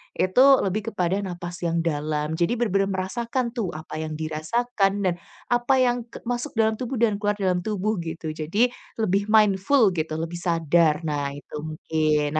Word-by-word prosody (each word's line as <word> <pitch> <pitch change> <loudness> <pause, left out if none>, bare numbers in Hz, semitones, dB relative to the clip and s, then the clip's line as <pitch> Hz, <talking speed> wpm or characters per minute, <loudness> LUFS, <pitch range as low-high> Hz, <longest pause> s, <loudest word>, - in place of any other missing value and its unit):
itu 185 +8 +4 0.2
lebih 210 +4 -2
kepada 185 0 0
napas 175 -1 -6
yang 170 0 0
dalam. 150 -1 -1
Jadi, 175 +8 +2
benar-benar 195 -4 +1
merasakan 235 +6 -2
tuh, 210 -8 -2
apa 155 0 -8
yang 155 -1 -4
dirasakan, 195 +8 0 0.2
dan 175 - +1 0.4
apa 240 +2 +2
yang 245 -1 +2
ke - - -10
masuk 245 +4 -2
dalam 220 -1 +2
tubuh 255 +1 -3
dan 225 -3 +3
keluar 205 0 0
dalam 185 -2 +1
tubuh 215 +1 -1
gitu. 165 -1 -5
Jadi, 175 +11 +2 0.3
lebih 200 -1 +1
mindful 210 +2 +4
gitu, 155 -1 -2
lebih 165 +1 -4
sadar. 165 -2 +2
Nah, 145 -2 -1
itu 145 - -11
mungkin. 155 -1 0
185 Hz, 165 wpm, -24 LUFS, 160-220 Hz, 0.4 s, itu